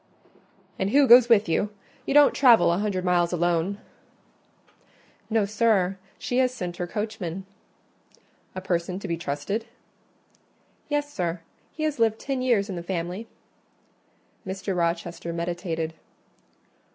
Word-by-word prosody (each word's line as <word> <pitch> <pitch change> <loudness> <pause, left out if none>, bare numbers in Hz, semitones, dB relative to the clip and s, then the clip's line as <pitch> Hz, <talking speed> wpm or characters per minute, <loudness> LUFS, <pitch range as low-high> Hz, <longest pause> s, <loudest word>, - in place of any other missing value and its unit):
"And 190 - 0
who 280 +5 +5
goes 245 0 +8
with 215 -4 +5
you? 185 +5 0 0.4
You 275 - 0
don't 295 -1 +7
travel 235 -10 +5
a 175 - -1
hundred 200 -3 -2
miles 175 -1 +2
alone." 175 +2 0 1.5
"No, 220 -2 +2
sir, 200 -3 +1 0.2
she 245 - -1
has 255 -1 +3
sent 180 -8 -6
her 175 - -3
coachman." 195 -3 -4 1.1
"A 185 - -4
person 180 -1 -2
to 200 - -6
be 170 - -1
trusted?" 165 +7 -3 1.2
"Yes, 290 0 -1
sir, 170 -2 -2 0.3
he 310 - -6
has 305 -4 -1
lived 225 -1 +2
ten 270 0 -3
years 235 -6 +2
in 195 - -5
the - - -4
family." 180 +4 -4 1.2
Mr. 190 0 -4
Rochester 170 0 -2
meditated. 170 -1 -3
190 Hz, 130 wpm, -25 LUFS, 175-225 Hz, 1.5 s, goes